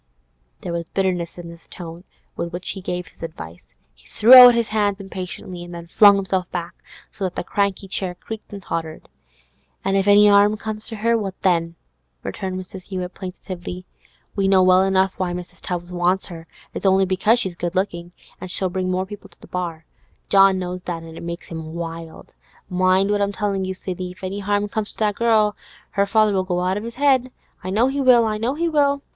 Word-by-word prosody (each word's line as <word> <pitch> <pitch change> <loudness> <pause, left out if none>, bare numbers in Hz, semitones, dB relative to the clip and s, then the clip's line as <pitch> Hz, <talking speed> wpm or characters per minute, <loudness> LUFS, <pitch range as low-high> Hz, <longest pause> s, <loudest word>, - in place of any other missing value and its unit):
There 175 - -5
was 170 0 -3
bitterness 180 -2 -2
in 175 -1 -8
the 170 - -10
tone 170 +1 -10 0.3
with 170 - -4
which 180 +1 -4
he 195 - -7
gave 180 -1 -4
this - - -20
advice; 85 - -8 0.3
he - - -23
threw 230 +4 +5
out 250 -2 +11
his 235 -2 0
hands 205 -2 0
impatiently, 185 -2 -7
and 175 0 -9
then 170 0 -8
flung 200 +4 +6
himself 190 -2 -1
back, 175 0 -5 0.4
so 200 - -7
that 185 -2 -2
the - - -3
cranky 200 +1 -1
chair 185 -1 -2
creaked 220 +4 -9
and 200 -2 -8
tottered. 160 -3 -5 0.8
'An' 195 - +1
if 195 0 +1
'arm 205 +1 +6
comes 215 0 -5
to 225 - -6
her, 230 +2 +1
what 195 -4 -3
then?' 170 -3 +1 0.5
returned 185 -1 -4
Mrs. 185 0 -9
Hewett 185 -2 -5
plaintively. 180 -1 -7 0.5
'We 195 -2 +1
know 190 -1 +5
well 185 0 +5
enough 190 0 +2
why 180 -2 -1
Mrs. 180 0 -8
Tubbs 175 0 -5
wants 180 +2 +1
her; 165 -1 -10 0.3
it's - - -1
only 190 0 +4
because 210 +5 +2
she's 190 -6 -1
good 175 +1 -4
lookin', 175 -2 -2 0.3
an' - - -5
she'll 185 +1 -1
bring 185 0 -2
more 185 +1 0
people 200 0 -11
to 175 - -20
the - - -14
bar. 170 -3 -5 0.4
John 195 -1 +6
knows 180 0 -4
that, 170 -2 -5
an' 165 0 -11
it - - -9
makes 170 +1 -7
him 160 -1 -7
wild. 165 -1 -7 0.4
Mind 185 +2 +2
what 205 0 +1
I'm 200 0 +1
tellin' 195 -1 -1
you, 190 0 -4
Sidney; 185 -1 -5
if 190 +2 -21
any 195 +2 -4
'arm 205 +1 0
comes 210 0 -4
to - - -14
that 210 -1 +1
girl, 215 -1 +2 0.4
her 200 0 +1
father'll 210 -2 +3
go 180 -1 -1
out 185 +2 0
of 210 - -5
his 235 +1 -8
'ead. 265 -3 +3 0.3
I 185 - -4
know 215 +6 +3
he 275 +2 -1
will! 250 -3 +6
I 215 -1 -1
know 240 +5 -1
he 335 +2 0
will! 285 -3 +2
190 Hz, 210 wpm, -21 LUFS, 175-205 Hz, 0.8 s, out